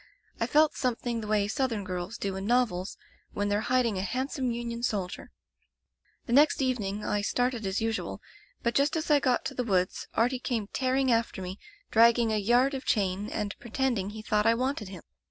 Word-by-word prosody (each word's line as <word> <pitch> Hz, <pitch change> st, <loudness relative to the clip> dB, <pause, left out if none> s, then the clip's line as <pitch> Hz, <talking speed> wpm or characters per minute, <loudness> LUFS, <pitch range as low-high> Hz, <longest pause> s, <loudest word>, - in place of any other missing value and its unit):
I -, -, 0 dB
felt 305 Hz, 0 st, +4 dB
something 240 Hz, -2 st, -2 dB
the 210 Hz, -, -6 dB
way 210 Hz, -1 st, +2 dB
Southern 230 Hz, -3 st, -1 dB
girls 185 Hz, +3 st, -5 dB
do 195 Hz, -1 st, -3 dB
in 190 Hz, +1 st, -4 dB
novels, 220 Hz, -7 st, +1 dB, 0.4 s
when 205 Hz, 0 st, -1 dB
they're 205 Hz, +1 st, +1 dB
hiding 235 Hz, -5 st, +1 dB
a -, -, 0 dB
handsome 255 Hz, +6 st, -2 dB
Union 235 Hz, 0 st, -4 dB
soldier. 200 Hz, -7 st, -3 dB, 1.0 s
"The 235 Hz, -, -2 dB
next 290 Hz, +3 st, +5 dB
evening 215 Hz, -6 st, -1 dB
I 205 Hz, -, 0 dB
started 245 Hz, 0 st, 0 dB
as 190 Hz, +2 st, -1 dB
usual, 225 Hz, 0 st, -2 dB, 0.4 s
but 235 Hz, -, +1 dB
just 280 Hz, +5 st, +2 dB
as 315 Hz, -1 st, -1 dB
I 295 Hz, -, +6 dB
got 255 Hz, -3 st, +1 dB
to -, -, -3 dB
the 250 Hz, -, -2 dB
woods, 185 Hz, -5 st, 0 dB
Artie 245 Hz, +3 st, +2 dB
came 235 Hz, -4 st, -2 dB
tear 260 Hz, -1 st, 0 dB
ing 265 Hz, -1 st, +2 dB
after 230 Hz, -3 st, 0 dB
me, 185 Hz, +2 st, -6 dB, 0.3 s
dragging 230 Hz, 0 st, +5 dB
a -, -, +2 dB
yard 245 Hz, +6 st, +3 dB
of 270 Hz, 0 st, -4 dB
chain 200 Hz, -3 st, 0 dB
and 210 Hz, -2 st, -3 dB
pretending 240 Hz, -5 st, -1 dB
he 215 Hz, +1 st, -8 dB
thought 210 Hz, 0 st, +1 dB
I 230 Hz, -, +5 dB
wanted 255 Hz, -3 st, -2 dB
him! 185 Hz, -4 st, -10 dB
230 Hz, 195 wpm, -28 LUFS, 205-255 Hz, 1.0 s, I